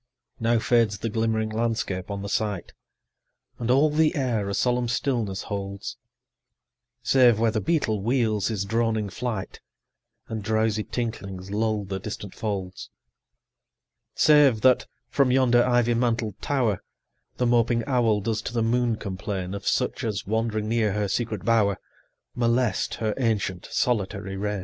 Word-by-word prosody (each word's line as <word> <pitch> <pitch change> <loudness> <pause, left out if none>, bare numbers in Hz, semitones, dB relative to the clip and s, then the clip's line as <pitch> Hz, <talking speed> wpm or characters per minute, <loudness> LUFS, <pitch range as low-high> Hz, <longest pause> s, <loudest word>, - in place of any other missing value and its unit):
Now 115 +1 +2
fades 115 -3 +2
the 115 +4 -3
glimmering 110 -1 0
landscape 110 -5 -2
on 100 -1 -4
the - - -4
sight, 105 -2 -2 0.8
5 - - -14
And 115 - -2
all 140 +4 +4
the 155 +1 +2
air 120 -8 0
a - - -2
solemn 125 +2 +1
stillness 115 -6 -1
holds, 100 -1 -5 1.1
Save 125 -4 +5
where 115 0 +2
the 110 -1 -1
beetle 145 -11 0
wheels 110 -3 +1
his 105 -3 -2
droning 110 -1 0
flight, 110 -4 -4 0.7
And 110 -1 -4
drowsy 110 0 +1
tinklings 100 -6 -5
lull 110 0 0
the 95 0 -4
distant 100 -1 -7
folds: 95 -4 -4 1.3
Save 145 -7 +5
that, 130 -1 +4 0.2
from 140 -2 +2
yonder 125 -2 +4
ivy 120 -1 +2
mantled 115 -3 -1
tower, 125 -9 0 0.6
The 125 - +1
moping 120 -1 +2
owl 120 -6 +2
does 110 +1 -1
to 115 - -6
the 115 -2 +1
moon 120 0 +1
complain 95 -2 -4
10 - - -5
Of 100 0 -6
such - - 0
as, 105 -4 -2
wandering 110 0 -1
near 110 -3 +1
her 105 0 0
secret 110 0 -2
bower, 105 -4 +3 0.6
Molest 120 -3 +1
her 110 -2 -1
ancient 105 -7 -1
solitary 100 -5 -1
reign. 105 +1 -2
110 Hz, 150 wpm, -25 LUFS, 100-120 Hz, 1.3 s, Save